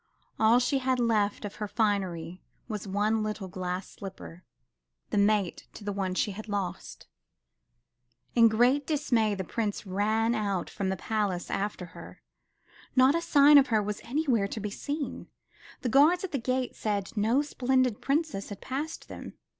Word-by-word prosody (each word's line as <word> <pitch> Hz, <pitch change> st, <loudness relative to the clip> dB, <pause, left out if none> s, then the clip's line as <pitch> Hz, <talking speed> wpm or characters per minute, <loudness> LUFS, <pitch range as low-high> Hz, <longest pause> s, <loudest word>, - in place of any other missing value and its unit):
All 220 Hz, +2 st, +6 dB
she 250 Hz, +3 st, +2 dB
had 260 Hz, -1 st, 0 dB
left 215 Hz, -3 st, +1 dB
of 205 Hz, -, -7 dB
her 210 Hz, -, -3 dB
finery 185 Hz, -6 st, -1 dB, 0.3 s
was 210 Hz, -3 st, -5 dB
one 210 Hz, +3 st, +1 dB
little 215 Hz, -2 st, -3 dB
glass 185 Hz, 0 st, -4 dB
slipper, 185 Hz, -3 st, -10 dB, 0.7 s
the 210 Hz, -, 0 dB
mate 200 Hz, -3 st, +1 dB
to -, -, -10 dB
the 205 Hz, -, -2 dB
one 190 Hz, -2 st, -2 dB
she 205 Hz, -, 0 dB
had 215 Hz, +3 st, -8 dB
lost. 200 Hz, -3 st, -4 dB, 1.3 s
In 230 Hz, -1 st, +7 dB
great 245 Hz, +6 st, +3 dB
dismay, 240 Hz, -9 st, +1 dB
the 190 Hz, -, -3 dB
Prince 210 Hz, +2 st, -3 dB
ran 215 Hz, +4 st, +1 dB
out 200 Hz, -5 st, -1 dB
from 195 Hz, -2 st, -2 dB
the 190 Hz, -, -1 dB
palace 200 Hz, -2 st, -2 dB
after 200 Hz, -2 st, -2 dB
her. -, -, -12 dB, 0.7 s
Not 260 Hz, +2 st, +6 dB
a 335 Hz, -, 0 dB
sign 290 Hz, -3 st, +7 dB
of 275 Hz, -, +3 dB
her 220 Hz, -4 st, +2 dB
was 210 Hz, 0 st, -4 dB
anywhere 250 Hz, -7 st, +1 dB
to 215 Hz, -, -5 dB
be 210 Hz, 0 st, -4 dB
seen. 285 Hz, +6 st, -4 dB, 0.5 s
The 250 Hz, -, -1 dB
guards 305 Hz, -, +5 dB
at 380 Hz, -, -4 dB
the 280 Hz, -, -1 dB
gate 255 Hz, +1 st, -1 dB
said 205 Hz, -1 st, -2 dB
no 225 Hz, +7 st, +2 dB
splendid 255 Hz, -4 st, +1 dB
Princess 280 Hz, -7 st, -1 dB
had 200 Hz, -2 st, -7 dB
passed 290 Hz, +5 st, -5 dB
them. -, -, -9 dB
215 Hz, 165 wpm, -28 LUFS, 200-255 Hz, 1.3 s, In